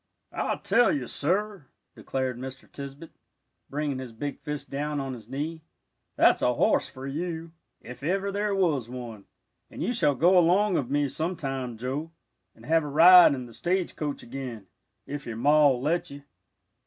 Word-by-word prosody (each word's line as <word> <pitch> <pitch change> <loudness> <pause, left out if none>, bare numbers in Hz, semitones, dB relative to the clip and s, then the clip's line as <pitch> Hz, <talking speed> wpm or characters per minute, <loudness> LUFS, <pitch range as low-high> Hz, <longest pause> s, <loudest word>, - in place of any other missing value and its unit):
"I - - -1
tell 245 - +3
you, 135 -4 -1
sir," 185 - -1 0.3
declared 130 -2 -3
Mr. 130 +1 -8
Tisbett, 140 +3 -9 0.6
bringing 145 -2 -2
his 130 -2 -7
big 140 +6 -5
fist 150 -1 -6
down 145 +1 -2
on 135 -1 -4
his 115 -2 -11
knee, 155 +5 -4 0.5
"that's - - +4
a 125 0 +2
horse - - +2
for 130 +1 -9
you, 165 +3 -4 0.3
ef 125 +1 -10
ever 195 +6 -1
there 205 0 -1
was 150 -11 +1
one. 120 -5 -8 0.4
And - - -6
you 245 - 0
shall 150 - +2
go 180 +6 +5
along 185 +3 +3
of 130 -6 -1
me 145 +1 +1
sometime, 135 -6 -3
Joe, 135 +7 -4 0.5
and - - -16
have 165 0 +3
a - - -5
ride 170 +2 +8
in 125 -2 -7
th' 115 - -14
stage 180 +4 -1
coach 145 -2 -4
again, 120 -4 -7 0.4
if 145 -1 -6
your 115 -2 -5
Ma'll 145 0 +4
let 155 +7 -1
you." 140 0 -10
145 Hz, 170 wpm, -27 LUFS, 130-165 Hz, 0.6 s, ride